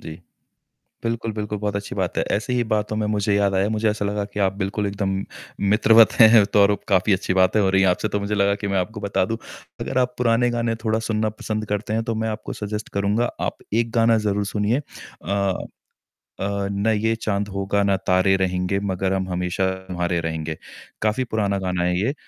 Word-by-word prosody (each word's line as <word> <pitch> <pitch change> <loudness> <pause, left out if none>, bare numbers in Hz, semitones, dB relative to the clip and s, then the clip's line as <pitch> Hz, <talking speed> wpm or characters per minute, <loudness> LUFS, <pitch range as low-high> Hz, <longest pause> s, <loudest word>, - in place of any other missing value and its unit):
जी। 80 +2 -9 0.8
बिल्कुल, 115 -1 -2
बिल्कुल। 105 0 -3
बहुत 105 -1 -2
अच्छी 100 0 -4
बात - - -2
है। - - +2
ऐसी 115 +4 -2
ही 120 -1 +2
बातों 105 0 0
में 110 - -1
मुझे 105 0 +1
याद 100 -1 +2
आया, 100 - +1
मुझे 110 0 +1
ऐसा 105 -1 -2
लगा 100 0 -1
कि 105 - -4
आप 95 - -3
बिल्कुल 100 +1 -2
एकदम 100 -1 -2 0.6
मित्रवत 110 +1 +6
हैं। 110 -2 +8
तो 105 0 +3
और 100 +1 +5
अब 100 - -1
काफ़ी 100 +1 +3
अच्छी 95 - 0
बातें 95 +3 +3
हो 95 - +3
रही 95 0 +3
हैं 95 - +4
आपसे, 90 +4 0
तो 105 - -2
मुझे 100 +1 -2
लगा 100 0 +2
कि - - 0
मैं - - +2
आपको 105 +4 -4
बता 95 - +1
दूँ, 115 - -1 0.4
अगर - - -3
आप 125 -1 +1
पुराने 120 0 +2
गाने 115 -1 0
थोड़ा 110 -1 +1
सुनना 110 0 +1
पसंद 110 0 -2
करते 105 +1 -2
हैं 115 - 0
तो 115 - -1
मैं 110 - -1
आपको 110 0 -5
सजेस्ट 105 +1 -4
करूँगा, 105 +4 +1 0.2
आप - - -2 0.2
एक 115 - -5
गाना 115 0 +4
ज़रूर 100 0 0
सुनिए 110 +7 +1
अ 100 -7 -3 0.9
अ, 100 0 -2
"ना 100 +3 +1
ये 110 +1 +1
चाँद 105 -2 -2
होगा 100 +1 0
ना 100 -1 +2
तारे 95 +1 +4
रहेंगे, 90 +1 0
मगर 95 +1 -1
हम 95 -1 -2
हमेशा 90 +1 -1 0.2
तुम्हारे 90 -1 -1
रहेंगे।" 80 -1 -4 0.4
काफ़ी 110 +4 +1
पुराना 100 -2 +1
गाना 90 -1 -1
है 90 0 +1
ये, 125 +8 0
100 Hz, 215 wpm, -22 LUFS, 95-110 Hz, 0.9 s, हैं